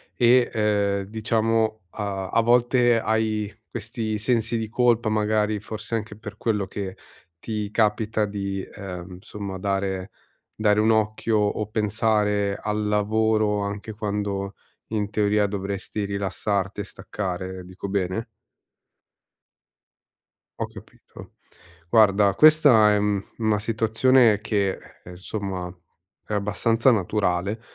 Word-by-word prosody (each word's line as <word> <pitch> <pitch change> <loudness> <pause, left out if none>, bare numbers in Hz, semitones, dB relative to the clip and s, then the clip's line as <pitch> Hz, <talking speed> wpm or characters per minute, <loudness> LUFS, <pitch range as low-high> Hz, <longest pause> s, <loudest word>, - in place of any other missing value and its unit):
e, 120 +1 +4
ehm, 100 -2 +1
diciamo 110 +1 0
a 100 -3 -4
a 115 - +3
volte 120 0 +4
hai 110 -2 -1 0.2
questi 110 -1 -3
sensi 115 +1 0
di 110 -1 -3
colpa, 120 -1 +2
magari 105 0 +1
forse 110 +1 -5
anche 105 -2 -5
per 105 -2 -9
quello 105 -4 0
che 95 0 -5 0.4
ti 105 +1 -4
capita 110 0 +1
di, 100 -1 -3
ehm, 90 -2 -8
insomma 100 0 -7
dare 95 0 -2 0.4
dare 105 -1 +2
un 110 +1 +4
occhio 110 0 +1
o 105 +1 0
pensare 105 -1 +1
al 105 0 -1
lavoro 105 0 +1
anche 100 +2 -5
quando 100 -1 -3 0.4
in 105 -2 -1
teoria 105 -1 +2
dovresti 100 +1 -4
rilassarti 100 0 -2
e - - -3
staccare, 95 -2 -5
dico 95 +2 -7
bene? 95 +3 -1 2.4
Ho - - 0
capito. - - -14 0.5
Guarda 100 -2 +4
questa 145 -7 +6
è, - - +3
mhmm, 100 -1 0
una 110 -2 +1
situazione 110 +1 +3
che, 100 -2 0 0.3
ehm, 90 - -10
insomma 95 -1 -5 0.5
è - - -7
abbastanza 115 +4 +2
naturale, 100 -1 0
105 Hz, 115 wpm, -24 LUFS, 100-110 Hz, 2.4 s, questa